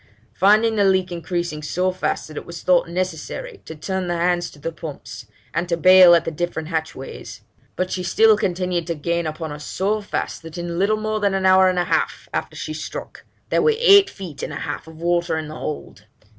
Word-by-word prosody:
Finding 215 - +4
the 205 - +4
leak 190 -2 +2
increasing 170 -2 -3
so 180 +5 0
fast, 180 -3 -3
it 150 - -6
was 170 -1 -9
thought 180 -2 +3
necessary 185 - -4
to 160 - -8
turn 185 +4 -3
the 175 0 -1
hands 175 0 +1
to - - -16
the 155 +3 -4
pumps, 160 -3 -9 0.3
and 170 +2 -2
to 170 - +1
bail 185 0 +8
at 170 - +1
the - - -2
different 160 0 -3
hatchways; 160 -5 -5 0.3
but 185 0 -2
she 185 - -2
still 220 +5 +4
continued 180 -3 -1
to 170 - -2
gain 170 +2 -1
upon 155 0 -5
us 150 0 -8
so 210 +6 -1
fast, 205 - -4
that 165 +1 -10
in 170 0 -4
little 210 +3 +2
more 215 0 -2
than 200 -2 +1
an 190 0 -1
hour 185 0 +6
and 185 - -1
a 175 - +3
half - - -1
after - - -3
she - - -5
struck, - - -7 0.2
there - - +2
were 460 -1 +3
eight 400 -4 +7
feet 180 - -9
and - - -4
a - - -5
half - - -5
of 160 0 -13
water 170 -1 0
in 155 -1 -4
the 155 - -8
hold. 145 -10 -6
175 Hz, 215 wpm, -21 LUFS, 165-190 Hz, 0.3 s, bail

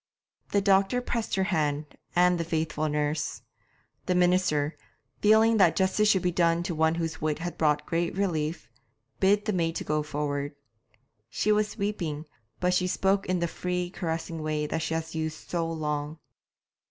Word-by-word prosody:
The 200 - +3
doctor 195 +4 +3
pressed 235 -2 -2
her 190 - +2
hand, 150 -6 -1 0.2
and 180 0 +4
the - - 0
faithful 155 -1 -1
nurse. 150 +1 -2 0.6
The 180 - +2
minister, 175 -4 +2 0.4
feeling 220 +2 +5
that 185 -5 +5
justice 200 +2 +2
should 190 -4 +3
be 180 - +2
done 170 0 +2
to 175 -1 -2
one 160 +1 +2
whose 165 -1 -3
wit 155 -1 0
had 175 +2 -5
brought 150 -1 +1
great 170 +1 -1
relief, 160 - -1 0.5
bid 205 +2 +3
the 215 - 0
maid 165 -2 0
go 150 0 +1
forward. 145 -1 -3 0.7
She 215 - 0
was 210 +1 +1
weeping, 175 -8 -2 0.3
but 180 0 +2
she 180 0 +2
spoke 195 +2 +1
in 180 -1 0
the 170 - +1
free, 180 +1 -3
caressing 165 -1 -3
way 155 -1 -1
that 160 - -2
she 160 +1 -1
had 160 0 -4
used 160 -1 -4
so 165 -2 -1
long. 150 -1 -3
170 Hz, 165 wpm, -27 LUFS, 155-190 Hz, 0.7 s, feeling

